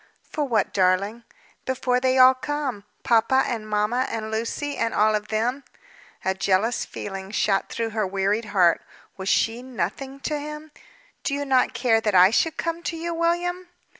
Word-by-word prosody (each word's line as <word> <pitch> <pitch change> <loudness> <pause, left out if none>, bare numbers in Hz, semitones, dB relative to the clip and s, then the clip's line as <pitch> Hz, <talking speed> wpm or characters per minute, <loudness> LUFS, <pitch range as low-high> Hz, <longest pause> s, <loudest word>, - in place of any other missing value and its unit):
"For 300 - -3
what, 225 -6 0
darling?" 195 +5 +1 0.4
"Before 250 -1 0
they 260 0 +2
all 255 0 +8
come. 265 -6 -4 0.2
Papa 235 +3 +3
and 220 -3 -4
mamma, 210 +5 +1
and 220 -1 -4
Lucy, 235 +6 -3
and 230 - -1
all 215 +1 +4
of 210 0 -2
them." 240 +6 -1 0.6
A 190 - +2
jealous 195 +5 +1
feeling 195 -1 -7
shot 200 -1 0
across 225 -2 -2
her 215 -3 0
wearied 200 +4 0
heart. 185 -5 +3 0.3
Was 190 0 -4
she 230 +2 +1
nothing 260 +3 -4
to 300 +1 -2
him? 300 +1 -8 0.5
"Do 280 - -1
you 285 0 -3
not 260 -2 +2
care 230 -3 +2
that 210 -3 0
I 185 +2 +7
should 320 +7 +1
come 335 0 -2
to 335 -1 -4
you, 340 +1 -3
William?" 350 +2 -1
230 Hz, 170 wpm, -24 LUFS, 210-275 Hz, 0.6 s, all